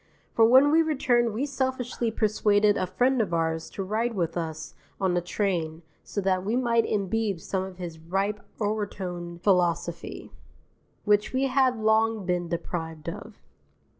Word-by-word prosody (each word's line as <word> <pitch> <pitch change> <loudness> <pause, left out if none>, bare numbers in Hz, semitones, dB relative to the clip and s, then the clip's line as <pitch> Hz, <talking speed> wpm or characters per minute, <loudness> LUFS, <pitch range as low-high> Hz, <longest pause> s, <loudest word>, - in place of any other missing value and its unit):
For 225 - +5
when 260 +5 +6
we 325 +1 +5
returned 255 -7 +2
we 230 +7 -1
selfishly 260 -4 -2
persuaded 210 -1 +2
a 185 - -1
friend 250 +6 +2
of 180 -6 -1
ours 160 -1 -1
to 195 - -5
ride 225 +4 -1
with 170 -4 -1
us 160 -2 -4 0.3
on 190 -2 +1
the 175 - +1
train 175 -3 -2 0.2
so - - -4
that 185 -1 +1
we 215 +4 -1
might 235 -3 +2
imbibe 205 -1 -1
some 190 +3 -2
of 190 -1 -7
his 170 -3 -7
ripe 195 +5 -1 0.2
orotund 185 -5 -3
philosophy, 175 -3 0 0.7
which 210 +2 +2
we 260 +1 +1
had 260 -2 +2
long 220 -1 +2
been 175 -1 -1
deprived 165 -2 -4
of. - - -8
205 Hz, 155 wpm, -26 LUFS, 175-230 Hz, 0.7 s, when